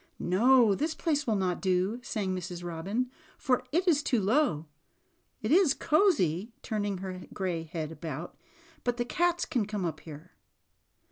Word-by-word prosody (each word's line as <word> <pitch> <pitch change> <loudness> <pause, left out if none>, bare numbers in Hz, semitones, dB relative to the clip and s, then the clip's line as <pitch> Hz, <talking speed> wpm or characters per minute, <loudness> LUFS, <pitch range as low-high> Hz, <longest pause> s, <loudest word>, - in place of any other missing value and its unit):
"No, 230 +4 +4
this 310 - -1
place 295 -4 0
will 220 - +2
not 185 -3 -1
do," 190 +4 +1
sang 200 -6 -2
Mrs. 175 -1 -6
Robin, 195 +9 -2 0.3
"for 250 -3 +1
it 355 +4 +1
is 310 -4 +4
too 255 -4 +1
low. 210 - +2 0.8
It 215 - -1
is 335 -4 +5
cozy," 230 - +2
turn 215 -3 -2
ing 200 -2 -2
her 185 -1 -7
gray 180 -4 -1
head 160 -1 -5
about, 160 0 -6 0.5
"but 245 -1 0
the 240 - -1
cats 350 +6 +1
can 240 -9 -1
come 210 -3 -2
up 155 -3 -3
here." 155 +3 -11
205 Hz, 160 wpm, -29 LUFS, 180-260 Hz, 0.8 s, is